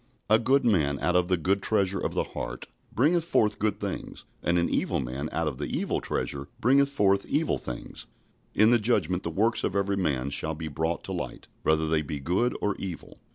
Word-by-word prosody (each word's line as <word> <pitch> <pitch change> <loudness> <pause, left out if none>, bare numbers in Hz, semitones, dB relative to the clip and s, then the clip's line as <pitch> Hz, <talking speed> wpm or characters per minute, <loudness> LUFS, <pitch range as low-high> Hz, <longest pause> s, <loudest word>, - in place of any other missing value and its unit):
"A 110 - +7
good 135 +4 +3
man 75 -11 +2
out 90 - +1
of 90 -1 +3
the 90 -1 +2
good 95 +4 +1
treasure 100 -3 +1
of - - -3
the - - +2
heart - - -6 0.3
bringeth 160 +7 +3
forth 110 -10 +1
good 105 -1 0
things: - - -5 0.2
and 85 +2 +1
an 85 - +2
evil - - 0
man 65 +4 -3
out 85 -1 -1
of 70 -3 -4
the 75 - -2
evil - - -1
treasure 70 0 -3
bringeth 140 +4 +4
forth 100 -7 +2
evil - - 0
things." 60 -1 -7 0.5
In 110 +3 +5
the 120 - +5
Judgment 105 -5 +1
the - - -3
works 110 +8 +1
of 95 - -1
every 100 0 +1
man 70 -7 0
shall 80 +3 0
be 80 0 -5
brought 80 +3 -2
to - - -6
light, - - -5
whether 80 0 +2
they 80 0 +2
be 75 -1 -5
good 90 - 0
or 105 -1 +1
evil. 90 -4 -7
90 Hz, 210 wpm, -27 LUFS, 80-110 Hz, 0.5 s, A